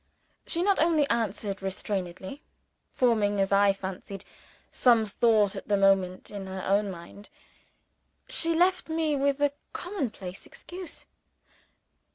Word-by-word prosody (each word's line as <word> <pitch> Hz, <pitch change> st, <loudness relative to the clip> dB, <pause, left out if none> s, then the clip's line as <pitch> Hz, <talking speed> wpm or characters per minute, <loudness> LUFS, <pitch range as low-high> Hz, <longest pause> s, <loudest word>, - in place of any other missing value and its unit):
She 340 Hz, -, +1 dB
not 400 Hz, 0 st, +3 dB
only 315 Hz, -3 st, +3 dB
answered 210 Hz, -3 st, -1 dB
restrainedly 190 Hz, +4 st, -4 dB, 0.5 s
(forming, 215 Hz, -5 st, +2 dB
as 195 Hz, 0 st, +1 dB
I 200 Hz, 0 st, +5 dB
fancied, 195 Hz, 0 st, -7 dB, 0.5 s
some 235 Hz, -3 st, +4 dB
thought 215 Hz, -1 st, +2 dB
at -, -, -7 dB
the 205 Hz, -, +2 dB
moment 195 Hz, -2 st, +2 dB
in 200 Hz, -2 st, -6 dB
her 190 Hz, -1 st, -5 dB
own 200 Hz, +1 st, +2 dB
mind) 185 Hz, +3 st, -10 dB, 1.0 s
she 330 Hz, 0 st, +2 dB
left 360 Hz, +1 st, +2 dB
me, 320 Hz, -2 st, 0 dB
with 280 Hz, 0 st, +1 dB
a 290 Hz, -1 st, +2 dB, 0.2 s
commonplace 235 Hz, -, -5 dB
excuse. 360 Hz, 0 st, -10 dB
210 Hz, 125 wpm, -28 LUFS, 195-290 Hz, 1.0 s, I